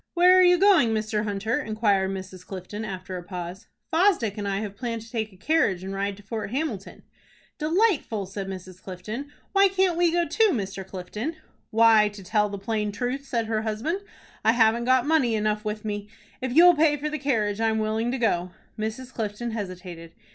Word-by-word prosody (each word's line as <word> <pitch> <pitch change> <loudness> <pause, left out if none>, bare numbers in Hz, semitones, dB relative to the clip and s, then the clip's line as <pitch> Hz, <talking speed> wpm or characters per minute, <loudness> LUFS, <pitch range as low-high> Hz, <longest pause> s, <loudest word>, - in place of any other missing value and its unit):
"Where 360 +1 +7
are - - +7
you 360 -1 +6
going, 350 - +5
Mr. 215 0 -1
Hunter?" 215 +6 -1
inquired 210 -5 +1
Mrs. 185 -1 -7
Clifton, 195 +3 -7
after 185 -2 -5
a 175 - -7
pause. 180 +2 -7 0.3
"Fosdick 325 - +3
and 205 -2 -4
I 195 +1 -1
have 205 -2 -5
planned 230 -1 -4
to 225 - -15
take 220 -2 -2
a 190 - -18
carriage 205 - +1
and 190 +1 -5
ride 200 0 -2
to 205 - -15
Fort 215 +1 -4
Hamilton." 250 -6 -4 0.6
"Delightful!" 315 - +1
said 195 +1 -6
Mrs. 185 -1 -8
Clifton. 215 +10 -7 0.2
"Why 395 0 +6
can't 375 -2 +1
we 345 -1 +3
go 345 0 +1
too, 445 -1 +3
Mr. 195 -4 -3
Clifton?" 195 - -5 0.3
"Why, 220 -1 +5
to 205 -1 -11
tell 210 +2 +1
the 200 - -5
plain 210 +1 -2
truth," 250 +6 -3
said 235 -4 -1
her 220 -1 -1
husband, 225 - -2 0.4
"I 225 - +5
haven't 235 0 +3
got 255 0 +3
money 290 -7 +2
enough 210 0 0
with 215 0 -4
me. 205 -1 -4 0.3
If 260 -1 -2
you'll 345 +6 +8
pay 300 -1 +3
for 295 +2 -3
the 305 - -3
carriage, 220 -6 0
I'm 220 -1 +2
willing 220 +2 0
to 265 - -1
go." 180 -7 0 0.3
Mrs. 230 +4 -4
Clifton 220 +2 -3
hesitated. 180 -5 -7
220 Hz, 195 wpm, -25 LUFS, 200-260 Hz, 0.6 s, you'll